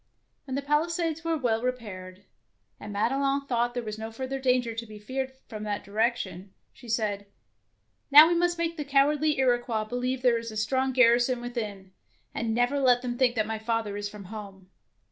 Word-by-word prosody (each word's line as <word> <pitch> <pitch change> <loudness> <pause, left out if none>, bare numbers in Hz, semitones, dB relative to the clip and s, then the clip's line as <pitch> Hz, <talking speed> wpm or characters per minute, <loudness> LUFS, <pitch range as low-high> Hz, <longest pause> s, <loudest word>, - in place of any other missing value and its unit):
When 265 -2 -4
the 280 - -2
palisades 330 +2 0
were 330 -1 0
well 230 -5 0
repaired, 200 -7 -5 0.6
and 210 - -8
Madelon 275 +6 0
thought 240 -2 0
there 245 - -2
was 215 -1 -6
no 220 0 -5
further 260 +3 -4
danger 250 -3 +1
to 225 +1 -5
be 215 0 -10
feared 260 +5 -4 0.2
from 215 -1 -7
that 210 -1 -3
direction, 200 -3 -2 0.2
she 240 - -14
said, 210 -3 -1 0.8
''Now 310 +4 +9
must 350 0 +1
we 335 - 0
make 335 0 -2
the 300 - -2
cowardly 290 +2 +2
Iroquois 240 -4 +1
believe 250 +3 -2
that - - +4
there 235 -1 +2
is 230 0 -7
a 215 - -7
strong 260 +5 +1
garrison 245 0 +4
within, 215 -6 -5 0.4
and 230 -1 -2
never 245 +4 +1
let 250 -2 +4
them 245 -1 -2
think 245 -1 +2
that 215 -2 +1
my 220 0 -4
father 220 -2 -2
is 205 0 -4
from 205 -1 -10
home. 195 -3 -10
240 Hz, 190 wpm, -27 LUFS, 215-270 Hz, 0.8 s, Now